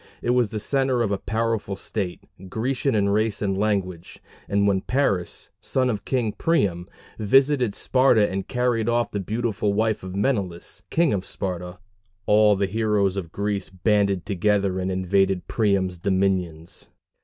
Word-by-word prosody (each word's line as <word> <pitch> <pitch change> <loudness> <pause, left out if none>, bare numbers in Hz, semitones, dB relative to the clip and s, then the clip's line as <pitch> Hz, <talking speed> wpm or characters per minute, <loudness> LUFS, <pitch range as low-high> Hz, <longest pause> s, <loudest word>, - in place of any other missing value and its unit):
It 120 - +1
was 125 -3 +2
the 110 - -4
centre 130 +1 +1
of 105 - -1
a 100 - -1
powerful 110 -2 -2
state, 95 -2 -4 0.3
Grecian 125 +4 -1
in 100 -1 +2
race 110 +1 +1
and 100 -2 -1
language; 95 -4 -2 0.3
and 100 0 +2
when 95 -1 +2
Paris, 100 -10 -1
son 130 -1 0
of 105 - -5
King 120 -5 0
Priam, 100 - 0 0.3
visited 130 +1 +3
Sparta 125 -5 +3
and 95 0 -4
carried 120 -2 0
off 120 0 +1
the 100 - -2
beautiful 105 0 -1
wife 110 +1 0
of 95 0 -7
Menelaus, 100 -6 -2
king 165 -5 +2
of 95 -2 -1
Sparta, 90 -3 -4 0.5
all 105 0 +5
the 100 0 0
heroes 105 -1 +1
of 90 -5 -5
Greece 100 -1 -2
banded 100 0 +1
together 100 -1 +1
and 95 +1 -2
invaded 95 0 +1
Priam's 95 -5 0
dominions. 95 -4 -1
100 Hz, 155 wpm, -24 LUFS, 95-115 Hz, 0.5 s, all